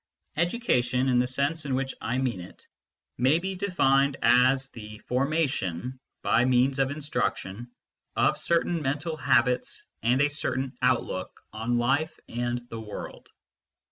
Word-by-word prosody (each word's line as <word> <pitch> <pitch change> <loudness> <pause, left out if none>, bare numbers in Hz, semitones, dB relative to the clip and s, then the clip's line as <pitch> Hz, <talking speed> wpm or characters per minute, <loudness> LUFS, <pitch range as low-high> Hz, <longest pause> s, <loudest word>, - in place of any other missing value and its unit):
Education, 135 - +1
in 125 -1 +4
the 125 - +2
sense 140 +5 -1
in 135 -3 -1
which 135 0 -2
I 120 +3 -1
mean 125 -7 -1
it, 90 - -12 0.5
may 130 +6 +4
be 190 +3 -3
denned 140 -8 +2
as 130 +2 +4
the 110 -2 -9
formation, 130 - -1 0.2
by 120 - +3
means 130 +2 +3
of 135 -1 +2
instruction, 125 -6 -3 0.5
of - - +3
certain 170 0 +1
mental 150 +4 -2
habits 125 -3 +1 0.2
and 120 +4 +2
a 145 - +5
certain 135 -3 -2
outlook 120 -7 0
on 115 +3 -1
life 140 +7 0
and 120 0 -3
the 115 0 -5
world. 105 -1 -8
130 Hz, 140 wpm, -27 LUFS, 120-145 Hz, 0.5 s, a